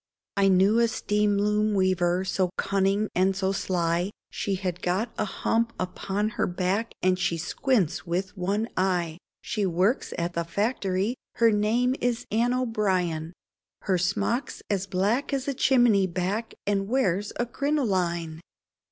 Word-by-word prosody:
I 200 -1 +3
knew 195 +4 +4
a 235 - +4
steam 210 -3 +1
loom 210 +1 +1
weaver 185 -1 +2
so 185 -1 0
cunning 195 +2 +1
and 190 +1 +2
so 190 0 0
sly, 175 -2 0 0.2
She 200 - -2
had 180 -2 -3
got 195 +6 -1
a 215 - -1
hump 230 +3 0
upon 195 +3 -2
her - - -1
back, 185 +5 -1
and 185 0 +3
she 180 -2 0
squints 205 - 0
with 180 +3 -3
one 200 +4 -1
eye, 175 -3 0 0.2
She 215 -3 -2
works 185 +8 +1
at 170 +1 -2 0.2
factory, 200 0 0 0.2
her 230 -1 +4
name 225 +5 +2
is 245 -1 0
Anne 235 +3 +2
O'Brian, 185 -9 0 0.5
Her 185 -3 +1
smock's 210 +8 -1
as 195 -1 0
black 205 +10 0
as 275 0 -1
a 280 - 0
chimney 240 -7 +4
back 185 +6 -2
and 195 -1 0
wears 205 -5 +1
a 240 - +2
crinoline. 185 - -1
195 Hz, 145 wpm, -26 LUFS, 180-225 Hz, 0.5 s, knew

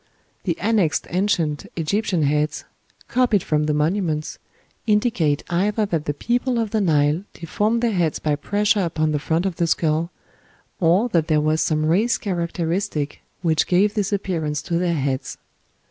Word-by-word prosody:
The 170 -4 0
annexed 200 -6 +1
ancient 175 -6 0
Egyptian 180 0 0
heads, 150 +1 0 0.4
copied 245 -7 +2
from 150 -1 +1
the 150 - +1
monuments, 155 -1 -1 0.5
indicate 210 - +2
either 205 +5 +1
that 165 -6 -2
the 145 - -1
people 245 - 0
of 225 -3 -1
the 220 - +1
Nile 155 -1 +2
deformed 210 +8 -1
their 235 - +2
heads 175 -6 0
by 150 -1 0
pressure 205 +7 +1
upon 155 -4 0
the 150 - 0
front 165 +4 0
of 190 -3 -2
the 170 - +1
skull, 160 +1 +1 0.7
or 175 +3 +4
that - - 0
EGYPTIAN 240 -8 0
HEADS. 160 - -3
there 155 -2 +3
was 155 +1 +1
some 155 -1 +1
race 200 +10 +2
characteristic 170 -4 -2 0.2
which 160 -3 +2
gave 195 +3 +3
this 205 -3 -1
appearance 165 -7 -2
to 170 -2 -1
their 175 -1 +1
heads. 135 -2 -2
170 Hz, 165 wpm, -22 LUFS, 155-205 Hz, 0.7 s, or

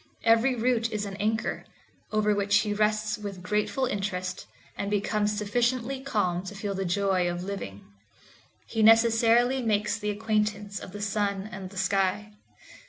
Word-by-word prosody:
Every 230 +3 +4
root 230 -1 +1
is 210 -1 -2
an 195 -1 -6
anchor, 220 +2 -1 0.5
over 210 -1 +2
which 200 +1 +3
he 210 -1 -1
rests 215 0 0
with 200 -3 -7
grateful 210 +7 0
interest, 185 -4 -3 0.3
and 200 - -3
becomes 210 0 0
sufficiently 240 +5 0
calm 205 -10 0
to 205 - -7
feel 200 0 -3
the 195 0 -2
joy 185 -1 +1
of 175 0 -4
living. 185 - -6 0.8
He 225 - -2
necessarily 230 +3 +5
makes 215 -1 0
the 210 -1 -2
acquaintance 210 -1 -1
of - - -9
the 205 +1 -6
sun 200 -1 -1
and 190 -1 -7
the 195 - -12
sky. 195 +2 0
210 Hz, 155 wpm, -27 LUFS, 195-225 Hz, 0.8 s, necessarily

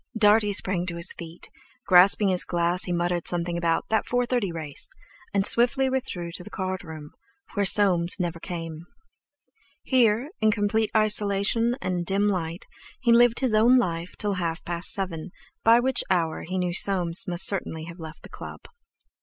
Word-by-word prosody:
Dartie 210 -1 +3
sprang 185 -2 +2
to 170 - -4
his 170 +2 +2
feet; 170 0 -10 0.3
grasping 195 +2 +6
his 185 -1 +1
glass, 175 +3 0
he 180 - -5
muttered 175 0 -2
something 175 0 -3
about 170 -1 -1
"that 220 - +1
4.30 245 -5 -1
race," 155 -4 -3 0.4
and 195 -1 0
swiftly 260 +4 +2
withdrew 180 -10 -4
to 180 - -10
the 210 - -12
card 185 -2 -5
room, 155 -3 -10 0.4
where 200 -3 0
Soames 180 -4 +4
never 170 -2 -3
came. 165 -2 -8 1.0
Here, 245 +2 +1
in 220 - +3
complete 215 +1 0
isolation 215 +2 +1
and 180 -1 -2
a - - -3
dim 195 +3 +1
light, 175 -3 -3 0.3
he 235 -2 +2
lived 240 +1 +3
his 255 -4 0
own 225 +4 +4
life 175 -7 -2
till 205 -1 -1
half 170 -3 -4
past 170 0 -1
seven, 185 -3 -5 0.3
by 230 +1 +5
which 260 +1 +2
hour 165 -4 -1
he 185 - -3
knew 180 -1 -2
Soames 180 -2 +2
must 180 +1 0
certainly 160 -5 -3
have 170 +2 -11
left 160 -1 -11
the - - -12
club. - - -10
185 Hz, 170 wpm, -24 LUFS, 170-215 Hz, 1.0 s, grasping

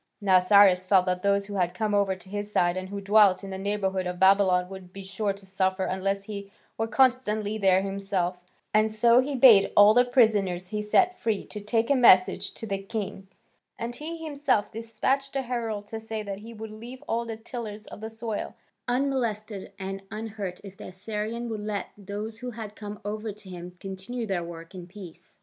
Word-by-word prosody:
Now 190 -3 +5
Cyrus 185 -1 +5
felt 185 -1 +5
that 180 -1 -1
those 200 0 +2
who 205 - -8
had 180 -1 0
come 215 +1 -1
over 200 -2 +2
to 185 - -17
his 205 +1 -4
side 175 -3 +2
and 185 0 -5
who 200 0 -5
dwelt 200 -1 +5
in 195 - -7
the 190 - -5
neighbourhood 195 -2 -1
of 180 0 -4
Babylon 190 -2 +4
would 190 -1 -10
be 195 +1 -9
sure 195 +2 -2
to 195 0 -10
suffer 190 0 0
unless 195 +1 -1
he 200 -1 -7 0.2
were 225 - -1
constantly 220 -4 +1
there 190 -1 +4
himself, 195 -2 -2 0.3
and 215 0 +3
so 235 +3 +5
he 275 +2 0
bade 235 -6 +7
all 205 +1 +8
the 245 +2 +6
prisoners 205 -8 +2
he 210 +1 -2
set 365 - +2
free 220 -3 -1
take 225 +4 -1
a - - +5
message 190 -8 +5
to - - -7
the 195 -2 -3
king, 195 -1 -5 0.5
and 235 +1 -4
he 325 +2 -6
himself 285 -8 0
despatched 230 +5 -2
a 270 - 0
herald 230 -4 -3
to 225 - -5
say 220 -1 -5
that 200 -1 -5
he 225 +2 -10
would 220 -1 -8
leave 235 +4 -10
all 235 +1 0
the 225 -1 -6
tillers 220 -2 -7
of - - -11
the 220 - -5
soil 225 -1 -5 0.3
unmolested 235 -6 -1
and 195 0 -5
unhurt 210 -4 -5
if 195 -1 -10
the - - -9
Assyrian 215 +5 -4
would 220 -2 -4
let 210 -2 -3
those 210 +2 -6
who 250 0 -5
had 220 -3 -8
come 210 -1 -8
over 215 +1 -3
to 205 -1 -11
him 180 0 -9
continue 195 +5 -5
their 190 -5 -2
work 170 +1 -9
in 180 -2 -9
peace. 185 -3 -13
205 Hz, 200 wpm, -27 LUFS, 190-225 Hz, 0.5 s, all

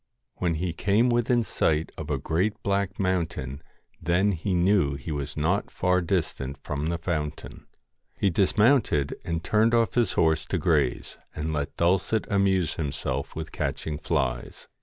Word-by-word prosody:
When 85 -3 0
he 85 +1 -2
came 105 +7 +2
within 120 0 +2
sight 80 -5 0
of - - -7
a - - 0
great 95 +6 -1
black 100 -1 -1
mountain 80 -8 -1 0.4
then 90 +5 +2
he 95 +1 -1
knew 90 -5 +3
he 70 +3 -6
was 70 -1 -4
not 85 +7 0
far 90 0 +1
distant 80 -6 -2
from 75 +1 -3
the 85 0 -1
fountain. 80 -3 -4 0.5
He 100 - +2
dismounted 100 - +3
and 85 -1 -3
turned 110 +2 +3
off 115 -1 +2
his 115 -7 +2
horse 80 -1 +2
to - - -1
graze, - - 0 0.2
and 80 +1 -3
let 75 -2 -3
Dulcet 95 +5 +2
amuse 95 -4 +2
himself 70 -3 -3
with 80 0 -5
catching 75 -2 -3
flies. 65 -4 -2
85 Hz, 155 wpm, -26 LUFS, 75-100 Hz, 0.5 s, knew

